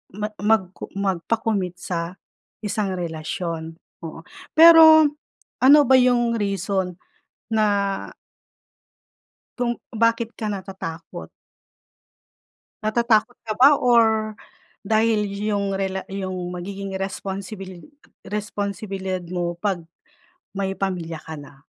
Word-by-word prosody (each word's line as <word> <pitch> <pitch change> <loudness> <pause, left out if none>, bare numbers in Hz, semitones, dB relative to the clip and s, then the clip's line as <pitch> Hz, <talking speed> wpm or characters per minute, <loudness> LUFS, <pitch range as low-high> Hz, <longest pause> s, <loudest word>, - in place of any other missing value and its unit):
ma 210 0 -2
mag 205 -4 +2
co - - -8
magpa-commit 195 0 -1
sa 170 0 -3 0.5
isang 205 -2 -1
relasyon, 165 -1 -4 0.3
oo 165 0 -8 0.4
pero, 320 -1 +9 0.6
ano 285 +3 +8
ba 260 - +6
yung 240 -2 +3
reason 195 -2 -1 0.6
na 215 -1 +3 1.9
kung 240 -1 -1 0.2
bakit 230 +1 +1
ka 220 - -3
natatakot? 190 -4 -7 1.5
Natatakot 235 +1 +2
ka 215 - -2
ba 285 +2 +8
or 220 -3 +3 0.5
dahil 215 0 +1
yung 200 -1 -2
rela 190 0 -2
yung 190 -1 -4 0.2
magiging 195 +1 -5
responsibili 195 -1 -6 0.4
responsibilidad 200 -2 -4
mo 175 -1 -2
pag 190 -5 -1 0.7
may 195 -1 -1
pamilya 175 -5 -4
ka 160 -1 -8
na? 145 0 -13
200 Hz, 95 wpm, -23 LUFS, 185-220 Hz, 1.9 s, pero